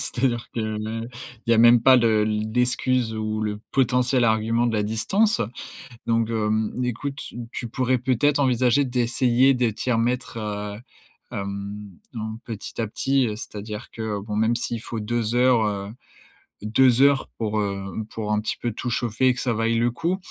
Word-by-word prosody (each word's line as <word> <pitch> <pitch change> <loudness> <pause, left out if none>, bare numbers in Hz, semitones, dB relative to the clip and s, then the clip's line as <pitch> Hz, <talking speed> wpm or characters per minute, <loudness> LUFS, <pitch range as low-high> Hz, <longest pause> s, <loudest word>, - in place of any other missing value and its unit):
c'est-à-dire 125 -2 -1
que, 110 -2 -2 0.7
il - - +1
y - - +6
a - - +2
même 120 0 +7
pas 130 +1 +7
le 110 -3 +3
l'excuse 120 +2 0
ou 110 0 -2
le 105 -1 -3
potentiel 125 -1 +2
argument 115 +2 +2
de 115 - 0
la 105 - +1
distance. 120 - +1 0.7
Donc 115 -1 +1
hem, 110 -1 0
écoute, 135 +4 -3
s - - -8 0.2
tu 120 - -5
pourrais 130 +2 +1
peut-être 130 +4 +2
envisager 130 0 +3
d'essayer 125 +1 +3
de 125 -2 +1
t'y 115 +4 -3
remettre, 120 +1 0
heu, 105 -1 -4 0.5
hem, 100 +1 -5 0.3
en 110 0 -4
petit 110 0 -7
à 110 - -1
petit, 135 +3 +1
heu, 105 - -3
c'est-à-dire 105 0 -7
que 110 -2 -3
bon, 105 +1 -5
même, 110 +2 +2
s'il 115 -1 -3
faut 115 -1 -5
2 115 +1 -1
heures, 125 -2 +4
heu, 100 -1 -3 0.7
2 120 +4 +4
heures 140 -1 +4
pour, 110 -1 -1
heu, 100 -1 -2 0.3
pour 105 -1 -4
un 105 - +2
petit 105 - -3
peu 120 - -2
tout 125 +3 -4
chauffer 120 +1 0
et 130 - +5
que 125 - -7
ça 120 -3 0
vaille 115 +1 +1
le 120 +1 +2
coup. 170 +9 -1
115 Hz, 175 wpm, -24 LUFS, 110-125 Hz, 0.7 s, même